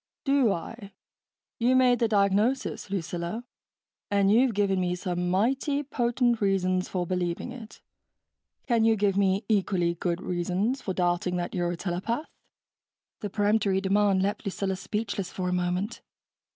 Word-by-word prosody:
"Do 275 Hz, -5 st, +3 dB
I? 200 Hz, +3 st, -6 dB, 0.7 s
You 245 Hz, +2 st, +3 dB
made 250 Hz, -2 st, +4 dB
the 230 Hz, -, +3 dB
diagnosis, 205 Hz, +4 st, +1 dB
Lucilla, 175 Hz, +3 st, -3 dB, 0.7 s
and 200 Hz, -1 st, +3 dB
you've 235 Hz, +1 st, +4 dB
given 200 Hz, -2 st, +2 dB
me 180 Hz, 0 st, 0 dB
some 180 Hz, -1 st, -2 dB
mighty 270 Hz, -, +1 dB
potent 240 Hz, -3 st, 0 dB
reasons 185 Hz, -2 st, +1 dB
for 180 Hz, -2 st, -2 dB
believing 180 Hz, +5 st, -2 dB
it... 230 Hz, -3 st, -11 dB, 0.8 s
can 235 Hz, -3 st, +2 dB
you 225 Hz, 0 st, +4 dB
give 200 Hz, -2 st, +1 dB
me 195 Hz, +1 st, +2 dB
equally 190 Hz, -5 st, +1 dB
good 170 Hz, 0 st, -2 dB
reasons 185 Hz, +8 st, -1 dB
for 190 Hz, -6 st, -4 dB
doubting 175 Hz, 0 st, 0 dB
that 175 Hz, -1 st, -3 dB
you're 175 Hz, -2 st, 0 dB
a -, -, -6 dB
telepath?" 195 Hz, -, -2 dB, 0.9 s
The 205 Hz, -, -4 dB
peremptory 205 Hz, -1 st, +2 dB
demand 195 Hz, 0 st, +2 dB
left 205 Hz, +2 st, -1 dB
Lucilla 195 Hz, -1 st, -2 dB
speechless 200 Hz, -1 st, -3 dB
for 180 Hz, -1 st, -3 dB
a -, -, -1 dB
moment. 180 Hz, +4 st, -1 dB
200 Hz, 145 wpm, -27 LUFS, 180-225 Hz, 0.9 s, made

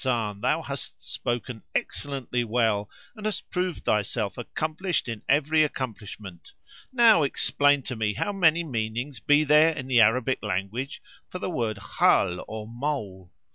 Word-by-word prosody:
[FN#487] 110 Hz, -6 st, -1 dB
thou -, -, +1 dB
hast -, -, -6 dB
spoken 120 Hz, -1 st, -3 dB
excellently 130 Hz, -3 st, -2 dB
well 110 Hz, -3 st, +1 dB, 0.3 s
and 215 Hz, -1 st, -4 dB
hast 215 Hz, -, -3 dB
proved 180 Hz, -2 st, -2 dB
thyself 105 Hz, 0 st, 0 dB
accomplished 155 Hz, +8 st, -2 dB
in 115 Hz, -3 st, -5 dB
every 150 Hz, +3 st, +4 dB
accomplishment! 105 Hz, -, -6 dB, 0.4 s
Now 235 Hz, -8 st, +6 dB
explain 145 Hz, 0 st, +2 dB
to 125 Hz, -, -5 dB
me 105 Hz, -2 st, -1 dB
how 205 Hz, -, -1 dB
many 170 Hz, -3 st, +3 dB
meanings 120 Hz, -1 st, -3 dB
be 145 Hz, +7 st, +4 dB
there 150 Hz, +2 st, +6 dB
in 135 Hz, -4 st, -6 dB
the 125 Hz, -3 st, +5 dB
Arabic 125 Hz, +4 st, +3 dB
language 105 Hz, -, -3 dB, 0.2 s
[FN#488] -, -, -49 dB
for -, -, -4 dB
the 180 Hz, -, -4 dB
word 115 Hz, -, -1 dB
Khal 90 Hz, -2 st, +2 dB
or 110 Hz, -1 st, -6 dB
mole." 115 Hz, -8 st, -4 dB
125 Hz, 150 wpm, -26 LUFS, 110-150 Hz, 0.4 s, Now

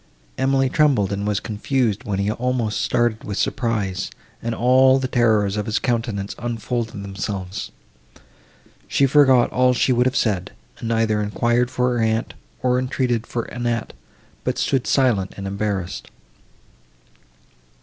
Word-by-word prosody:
Emily 135 Hz, 0 st, +2 dB
trembled, 130 Hz, -, +2 dB
and 100 Hz, +1 st, -2 dB
was 105 Hz, -1 st, +1 dB
confused, 115 Hz, +1 st, -1 dB
while 100 Hz, -4 st, -2 dB
he 100 Hz, +2 st, 0 dB
almost 120 Hz, -2 st, -1 dB
started 120 Hz, -2 st, 0 dB
with 100 Hz, -1 st, -5 dB
surprise, 100 Hz, -6 st, -1 dB, 0.3 s
and 115 Hz, 0 st, -2 dB
all 130 Hz, +2 st, +5 dB
the 130 Hz, -1 st, -1 dB
terrors 110 Hz, -5 st, +2 dB
of 105 Hz, -, -2 dB
his 105 Hz, -1 st, 0 dB
countenance 115 Hz, -5 st, -1 dB
unfolded 115 Hz, -2 st, -3 dB
themselves. 95 Hz, -1 st, -5 dB, 1.2 s
She 135 Hz, -, +3 dB
forgot 135 Hz, -3 st, +5 dB
all 125 Hz, 0 st, +3 dB
she 130 Hz, -, +2 dB
would 125 Hz, +1 st, +3 dB
have 130 Hz, -, -1 dB
said, 100 Hz, -6 st, 0 dB, 0.3 s
and 115 Hz, -, -5 dB
neither 115 Hz, -2 st, +1 dB
enquired 120 Hz, +4 st, +1 dB
for 125 Hz, -1 st, 0 dB
her 115 Hz, -, +1 dB
aunt, 110 Hz, 0 st, 0 dB, 0.3 s
nor 125 Hz, 0 st, +2 dB
entreated 125 Hz, -3 st, -1 dB
for 120 Hz, -, -2 dB
Annette, 120 Hz, -1 st, -3 dB, 0.5 s
but -, -, -1 dB
stood 135 Hz, -3 st, 0 dB
silent 115 Hz, -9 st, +2 dB
and 100 Hz, -, -6 dB
embarrassed. 100 Hz, -2 st, -3 dB
115 Hz, 140 wpm, -22 LUFS, 105-125 Hz, 1.2 s, all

